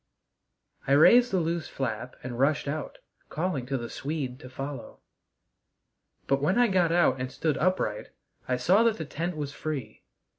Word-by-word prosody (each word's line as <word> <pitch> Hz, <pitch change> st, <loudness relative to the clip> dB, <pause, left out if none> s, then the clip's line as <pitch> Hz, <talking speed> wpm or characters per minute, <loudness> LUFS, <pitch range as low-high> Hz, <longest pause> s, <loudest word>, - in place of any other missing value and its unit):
I 135 Hz, -, +3 dB
raised 240 Hz, -, +7 dB
the 190 Hz, -, 0 dB
loose 170 Hz, -1 st, -2 dB
flap 125 Hz, -1 st, -4 dB
and 120 Hz, -1 st, -6 dB
rushed 145 Hz, +2 st, +2 dB
out, 150 Hz, +2 st, -4 dB, 0.3 s
calling 155 Hz, -7 st, -2 dB
to 135 Hz, 0 st, -1 dB
the 120 Hz, -1 st, -5 dB
Swede 135 Hz, -2 st, -4 dB
to 130 Hz, -, -11 dB
follow. 135 Hz, +2 st, -7 dB, 1.3 s
But 135 Hz, 0 st, +1 dB
when 170 Hz, +9 st, +2 dB
I 245 Hz, -1 st, +4 dB
got 180 Hz, -3 st, +2 dB
out 155 Hz, -7 st, +3 dB
and 130 Hz, 0 st, -3 dB
stood 155 Hz, 0 st, -1 dB
upright 165 Hz, -, 0 dB, 0.4 s
I 125 Hz, -, +1 dB
saw 180 Hz, -, +4 dB
that 230 Hz, -2 st, +3 dB
the 160 Hz, -, -4 dB
tent 165 Hz, +3 st, -4 dB
was 145 Hz, -1 st, -4 dB
free. 135 Hz, -9 st, -5 dB
145 Hz, 165 wpm, -27 LUFS, 130-170 Hz, 1.3 s, raised